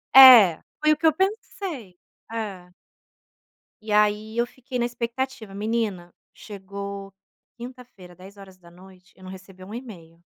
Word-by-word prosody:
É, 240 -11 +10 0.2
foi 305 0 +4
o - - -4
que 330 - -4
eu 315 - +4
pensei. 375 - -4 0.4
É. 195 -6 -6 1.1
E 215 -1 -4
aí 210 +1 +1
eu 235 - +2
fiquei 255 +1 -8
na 240 - 0
expectativa. 240 -3 -5
Menina, 205 -5 -3 0.2
chegou 200 -1 -8 0.4
quinta-feira 240 -7 -12
22h, 185 -1 -16
eu 185 - -18
não 185 - -9
recebi 185 0 -13
um 205 +3 -11
e-mail. 170 -9 -11
210 Hz, 130 wpm, -24 LUFS, 185-240 Hz, 1.1 s, É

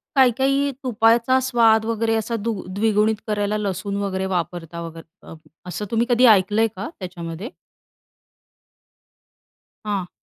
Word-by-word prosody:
काही-काही 270 +2 +3
तुपाचा 235 +1 +3
स्वाद 230 -4 +3
वगैरे 225 0 0
असा 225 +1 -2
दु 230 +1 -2 0.2
द्विगुणित 215 +1 +2
करायला 210 0 -1
लसूण 200 -1 -3
वगैरे 190 -1 -2
वापरता 170 -2 -4
वगैरे 165 +2 -11
अ, - - -9 0.3
असं 180 +4 -4
तुम्ही 230 +1 +2
कधी 245 +1 +4
ऐकलंय 210 +4 +1
का 200 +11 -5
त्याच्यामध्ये? 175 +3 -6 2.4
हां. 200 -4 -2
210 Hz, 115 wpm, -22 LUFS, 190-230 Hz, 2.4 s, कधी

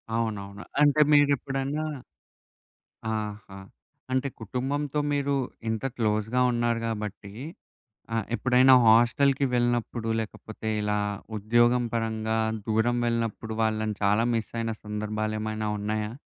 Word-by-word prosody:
అవునవును. 105 -3 -3 0.2
అంటే 150 +1 +5
మీరెప్పుడన్నా 140 +1 +2 1.3
ఆహా! 105 -2 -5 0.5
అంటే 130 +2 +1
కుటుంబంతో 135 +6 -2
మీరు 140 0 +1 0.3
ఇంత 110 +1 -2
క్లోజ్‌గా 110 +2 +1
ఉన్నారు 120 -1 0
గాబట్టి 105 -3 -5 0.8
ఆహ్, 115 -2 0
ఎప్పుడైనా 130 +1 +5
హాస్టల్‌కి 130 +5 +4
వెళ్ళినప్పుడు 120 -1 0
లేకపోతే, 110 0 -6
ఇలా 105 0 0 0.4
ఉద్యోగం 120 +4 +3
పరంగా 110 -1 -1 0.3
దూరం 110 +2 +2
వెళ్ళినప్పుడు, 115 -1 -2
వాళ్ళని 110 -1 0
చాలా 105 +3 +3
మిస్సయిన 115 0 -2
సందర్భాలేమైనా 110 0 -3
ఉన్నాయా? 105 +1 -2
115 Hz, 95 wpm, -27 LUFS, 110-125 Hz, 1.3 s, అంటే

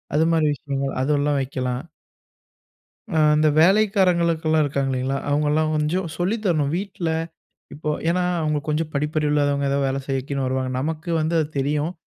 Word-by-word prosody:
அதுமாரி 160 0 +3
விஷயங்கள் 140 -1 -3
அதெல்லாம் 145 +1 +1
வைக்கலாம். 125 -1 -3 1.3
அ - - +1 0.2
இந்த 155 0 +4
வேலைக்காரங்களுக்கெல்லாம் 170 -5 +3
இருக்காங்க 140 -1 -1
இல்லைங்களா? 130 +1 -1
அவங்கல்லாம் 150 +2 +1
கொஞ்சம் 160 +4 0
சொல்லி 180 +7 0
தரணும். 150 -5 +1
வீட்ல, 190 -4 -3 0.6
இப்போ 150 +1 -3 0.2
ஏன்னா 180 +1 +1 0.2
அவங்க 150 -1 0
கொஞ்சம் 155 +1 -1
படிப்பறிவு 150 +1 0
இல்லாதவங்க. 145 -1 +1
ஏதோ 140 - +1
வேலை 135 +1 -1
செய்யக்கினு 135 0 -2
வருவாங்க. 130 0 -1
நமக்கு 160 +3 -3
வந்து 160 +2 0
அது 155 - +1
தெரியும். 150 +4 0
150 Hz, 140 wpm, -22 LUFS, 140-165 Hz, 1.3 s, இந்த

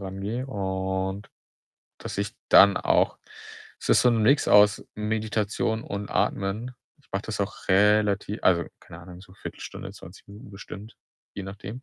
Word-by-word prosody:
rangehe. 100 +6 -4
Und 95 -2 -3 0.7
dass - - -7
ich 100 +1 -2 0.2
dann 100 0 +7
auch - - +2 0.6
es - - -3
ist - - +6
so 125 - +5
'n 115 -2 +2
Mix 140 +7 +3
aus 105 0 +6
Meditation 110 +1 -1
und 100 0 -5
Atmen. 110 +6 -1 0.2
Ich 145 - -30
mache 95 - -1
das 105 -2 -4
auch 100 +1 -7
relativ 105 +1 +3
also, 85 -2 +3 0.2
keine 85 - -12
Ahnung, 90 +1 -12
so 95 -1 -16
1/4 - - -9
Stunde, - - -8
20 90 +4 -14
Minuten 100 0 -13
bestimmt, 100 +2 -10 0.4
je 100 - -5
nachdem. 100 +5 -8
100 Hz, 155 wpm, -26 LUFS, 95-110 Hz, 0.7 s, dann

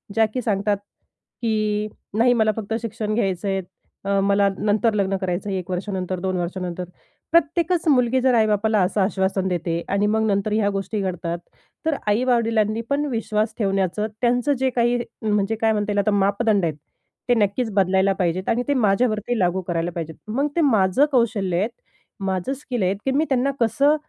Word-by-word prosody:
ज्या 225 0 +5
की 255 - -1
सांगतात, 205 -2 0 0.6
की 215 -2 0 0.3
नाही 245 +2 +5
मला 220 -2 +3
फक्त 220 0 -4
शिक्षण 220 -1 -3
घ्यायचं 195 -4 -1
आहे, 195 -1 0 0.4
अ, 200 0 +2
मला 200 0 +3
नंतर 215 +2 +1
लग्न 195 -2 0
कर 190 - -4
करायचं 180 +3 -2
1 185 -2 -3
वर्षानंतर, 185 0 -3
2 185 0 -1
वर्षानंतर. 180 0 -3 0.5
प्रत्येकच 335 +1 +2
मुलगी 255 -2 +3
जर 260 0 +3
आई-बापाला 215 -1 +2
असं 185 +3 +1
आश्वासन 190 -1 0
देते 170 -2 -1
आणि 200 +1 +1
मग 220 +1 +1
नंतर 200 0 0
ह्या 210 -2 +2
गोष्टी 200 +2 -3
घडतात. 175 -2 -3 0.5
तर 320 -2 +2
आई-वडिलांनी 225 -1 +2
पण 285 +1 +1
विश्वास 220 -2 -1
ठेवण्याचं 195 0 0
त्यांचं 245 +3 +2
जे 265 0 +2
काही 240 -1 +1 0.2
म्हणजे 210 -1 +1
काय 225 0 +3
म्हणता 210 -1 -1
येईल? 205 - +1
आता 200 +1 +2
मापदंड 200 0 +2
आहेत, 160 -3 -1 0.5
ते - - +6
नक्कीच 220 +1 +1
बदलायला 190 0 +3
पाहिजेत 180 +1 0
आणि 240 +2 +1
ते 285 - +2
माझ्यावरती 220 0 +1
लागू 180 0 +1
करायला 170 0 -1
पाहिजेत. 160 -2 -5
मग 265 +7 0
ते 340 - +2
माझं 220 - +4
कौशल्य 215 -8 +1
आहे, 205 - +1 0.6
माझं 190 +6 -1
स्किल 255 -5 -3
आहे, 185 +1 +2
की 270 - +2
मी 290 +4 +2
त्यांना 265 +1 +2
कसं 275 +6 +3
210 Hz, 175 wpm, -22 LUFS, 190-235 Hz, 0.6 s, ते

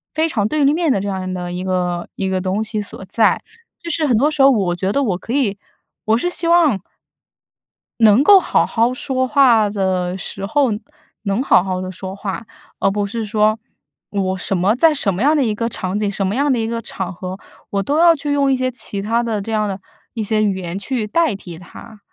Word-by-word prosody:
非 315 +1 +2
常 210 -10 0
对 300 +5 0
立 280 +1 +4
面 325 -2 +1
的 230 - +1
这 200 - -4
样 190 -1 -3
的 180 -1 -4
一 180 +1 -4
个 180 -2 -1
一 190 - -2
个 190 -1 -1
东 190 +3 -1
西 220 -1 -3
所 200 -1 -8
在。 215 +4 +2 0.4
就 335 - -5
是 310 -1 +1
很 245 -5 +3
多 290 +7 +2
时 300 - 0
候 270 - +8
我 190 -8 +1
觉 190 +2 -1
得 280 +6 +1
我 205 -8 0
可 225 - -8
以 240 -8 +1 0.5
我 220 +1 +3
是 245 - -1
希 350 -1 -2
望 330 - +4 1.2
能 220 +4 +6
够 395 +5 +8
好 - - +1
好 230 +2 +1
说 260 0 -1
话 245 -6 +4
的 190 -2 -1
时 195 +1 -6
候， 265 +6 +2 0.5
能 205 +4 0
好 185 - +5
好 185 -1 -2
地 185 0 -5
说 190 +1 -7
话， 200 +2 -5 0.3
而 - - +2
不 205 +1 -1
是 225 +2 -4
说 215 +1 +1 0.5
我 190 -2 -1
什 190 +1 -1
么 190 +4 +2
在 315 +5 +4
什 220 -9 +1
么 180 - -4
样 295 +4 +4
的 290 - +2
一 220 -4 0
个 230 +2 -2
场 190 -3 -3
景， 210 -1 0
什 195 0 -1
么 190 - -1
样 285 +2 +2
的 255 - +2
一 225 - -1
个 230 0 -3
场 190 -4 -5
合， 185 +1 -6 0.3
我 200 -1 0
都 285 +6 0
要 340 0 +6
去 290 -1 -4
用 280 -1 +2
一 - - +3
些 255 0 -1
其 210 -5 -4
他 225 +4 0
的 220 -3 -2
这 225 - -6
样 215 -1 0
的 195 -1 -4 0.3
一 225 - -3
些 215 +1 0
语 200 -2 +1
言 175 0 -5
去 235 +1 -2
代 325 0 +1
替 175 -4 -10
它。 215 +4 -13
215 Hz, 250 characters per minute, -19 LUFS, 190-260 Hz, 1.2 s, 候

